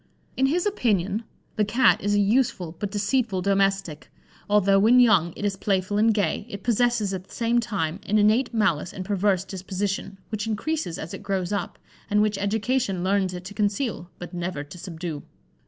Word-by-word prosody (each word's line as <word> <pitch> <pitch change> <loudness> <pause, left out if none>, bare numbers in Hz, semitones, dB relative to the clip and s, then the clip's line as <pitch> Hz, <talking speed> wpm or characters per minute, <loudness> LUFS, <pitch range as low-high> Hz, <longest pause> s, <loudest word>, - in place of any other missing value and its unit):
In 265 - +3
his 340 +7 0
opinion 220 - 0 0.3
the 215 - +3
cat 235 +5 +3
"is 205 0 +1
a - - +3
useful 200 -6 +1
but 205 - -2
deceitful 205 -1 0
domestic. 195 -5 0 0.4
Although 200 -1 +4
when 230 +5 +6
young 200 -9 +5
it 205 - -4
is 200 -1 0
playful 195 +1 0
and 225 +1 +5
gay, 205 0 -1
it 200 -2 -7
possesses 235 -3 +1
at 185 -1 -5
the - - -22
same 235 +1 +2
time 195 -7 -2
an 215 - +2
innate 215 +5 +3
malice 195 -8 0
and 185 - -6
perverse 195 -2 +1
disposition, 195 +1 -4
which 215 0 -3
increases 225 - -2
as 160 - -7
it - - -7
grows 195 -2 -2
up, 200 - -3 0.3
and 210 -1 +3
which 210 -2 0
education 205 -1 0
learns 190 -1 +1
it 180 - -7
to 200 - -7
conceal, 205 -2 -1
but 175 - -9
never 175 -4 -3
to 145 +5 -12
subdue. 165 -4 -6
200 Hz, 185 wpm, -25 LUFS, 185-220 Hz, 0.4 s, when